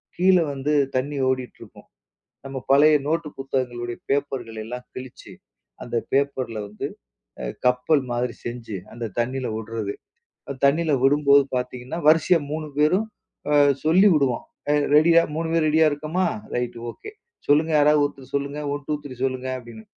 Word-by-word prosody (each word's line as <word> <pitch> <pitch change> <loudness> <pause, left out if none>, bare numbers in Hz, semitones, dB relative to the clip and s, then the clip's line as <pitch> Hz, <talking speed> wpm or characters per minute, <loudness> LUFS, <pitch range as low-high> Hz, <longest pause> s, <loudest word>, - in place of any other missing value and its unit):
கீழ 185 +1 +4 0.2
வந்து 140 +2 -1 0.2
தண்ணி 140 +3 -1
ஓடிட்டுருக்கும். 130 -1 -6 0.6
நம்ம 135 0 -6
பழைய 150 +2 +6
நோட்டு 165 0 0
புத்தகங்களுடைய 125 -3 -3
பேப்பர்களை 135 -5 -2
எல்லாம் 125 +2 -7
கிழிச்சு, 130 -1 -10 0.5
அந்த 120 - -6 0.2
பேப்பர்ல 135 -4 0
வந்து 105 +1 -5 0.5
அ 60 - -4 0.2
கப்பல் 125 +4 +3
மாதிரி 120 0 -1
செஞ்சு, 120 -3 -6 0.2
அந்த 120 0 -5
தண்ணியில 130 +2 -1
வுடுறது. 110 -2 -4 0.6
அ - - -2
தண்ணியில 155 +3 +2
விடும்போது 140 0 +5
பார்த்தீங்கன்னா, 125 +3 -4
வரிசையா 165 +2 +5
3 155 0 -3
பேரும் 185 +9 +3 0.4
அ - - +3 0.3
சொல்லி 180 +6 +5
வுடுவோம். 135 -6 +1 0.3
"அ - - +4 0.2
ரெடியா? 165 +2 +6
3 165 0 -2
பேர் 165 -1 +2
ரெடியா 160 +1 +4
இருக்கமா? 155 +6 -1 0.3
Right 120 -1 -2
okay. 420 - -11 0.4
சொல்லுங்க 155 +3 +3
யாராவது, 150 0 +5
ஒருத்தர் 135 -1 -8
சொல்லுங்க, 140 +1 -2
1, 145 0 -5
2, 150 - 0
3, 140 -3 -8
சொல்லுங்க." 130 0 -2
அப்பிடின்னு. 115 -3 -12
140 Hz, 145 wpm, -23 LUFS, 125-155 Hz, 0.6 s, பழைய